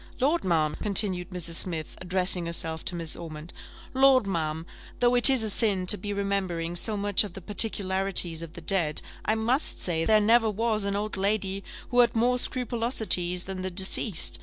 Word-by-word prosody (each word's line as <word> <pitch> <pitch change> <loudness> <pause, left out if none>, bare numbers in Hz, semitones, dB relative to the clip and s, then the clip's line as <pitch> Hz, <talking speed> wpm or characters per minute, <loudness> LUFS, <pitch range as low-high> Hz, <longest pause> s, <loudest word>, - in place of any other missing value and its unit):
Lord, 295 +6 0
ma'am," 160 -4 -1
continued 195 -3 +3
Mrs. 175 -3 -4
Smith, 165 -4 -3
addressing 180 -1 0
herself 165 -1 -3
to 180 - -3
Mrs. 165 0 -2
Ormond, 160 0 -10 0.4
"Lord, 265 -3 +3
ma'am, 160 -4 -4 0.3
though 245 0 +2
it 245 +2 +9
is 260 -4 +4
a 220 - -1
sin 200 -4 -1
to 195 - +5
be 205 +1 -7
remembering 190 -4 -3
so 210 +4 -1
much 205 0 +2
of 200 -4 -9
the 195 - -9
particularities 190 -4 +2
of 165 -1 -10
the 170 - -11
dead, 160 -3 0 0.2
I 220 - 0
must 235 +6 -1
say 165 -2 -1
there 215 +4 +3
never 225 +1 +2
was 215 0 -2
an 200 0 -3
old 210 0 -4
lady 195 0 -2 0.3
who 245 - +1
had 240 -1 +3
more 245 +2 +1
scrupulosities 230 -9 -1
than 190 -1 -7
the 185 - -4
deceased. 175 - +1
195 Hz, 185 wpm, -25 LUFS, 175-220 Hz, 0.4 s, it